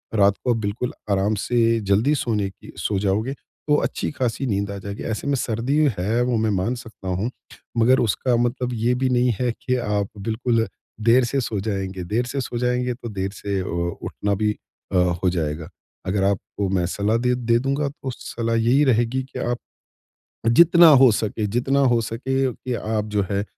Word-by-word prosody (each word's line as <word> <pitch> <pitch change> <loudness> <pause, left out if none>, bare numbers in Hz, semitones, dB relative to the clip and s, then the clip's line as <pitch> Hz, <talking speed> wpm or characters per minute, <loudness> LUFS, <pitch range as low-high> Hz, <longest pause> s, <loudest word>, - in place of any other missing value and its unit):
रात 100 -1 +5
को 125 - +3
बिल्कुल 110 +2 -3 0.2
आराम 100 +2 +2
से 115 +1 +2
जल्दी 110 +9 +3
सोने 105 -7 -1
की 95 - -14
सो 105 - -1
जाओगे, 105 +6 0
तो 150 +1 -3
अच्छी - - -2
खासी 125 -2 -2
नींद 100 -2 -1
आ 100 - -5
जाएगी। 100 +1 -6
ऐसे 110 +4 -3
में 140 - +2
सर्दी 120 +3 -1 0.2
है 105 +7 0
वो 125 -1 +1
मैं 110 0 +1
मान 100 +5 0
सकता 115 -5 -10
हूँ, 95 +6 -1 0.5
मगर 125 +3 +5
उसका 120 +3 +1
मतलब 120 +1 -1
ये 120 +1 +1
भी 130 +1 0
नहीं 125 0 +3
है 125 -1 +1
कि 125 +2 -2
आप 105 -5 -1
बिल्कुल 115 +2 0 0.4
देर 125 +2 +6
से 135 +3 0
सो 110 -4 -2
जाएँगे। 95 -2 -3
देर 110 +8 -1
से 135 +2 -3
सो 120 - -4
जाएँगे 125 +1 0
तो 120 -1 -8
देर 95 -2 -3
से 100 -2 -3
ओ 85 -1 -2
उठना 100 0 -2
भी 105 +1 +1 0.4
अ, - - +3
हो 90 0 +2
जाएगा। 80 -3 -3 0.4
अगर 95 +1 +1
आपको 100 0 -1
मैं 95 -2 +1
सलाह 100 +5 0
दे 125 +1 +1
दे 120 -1 +2
दूँगा 140 +3 0
तो 140 -2 -6
सलाह 115 -1 -3
यही 120 +6 +3
रहेगी 120 0 +2
कि 130 - -8
आप 120 0 -1 0.9
जितना 170 +6 +7
हो 135 -4 +7
सके 105 0 -1
जितना 125 +6 +1
हो 120 - +3
सके 130 +4 -1
कि 125 +1 -5
आप 110 -2 -1
जो 105 - +3
है 100 0 0
115 Hz, 190 wpm, -23 LUFS, 100-125 Hz, 0.9 s, जितना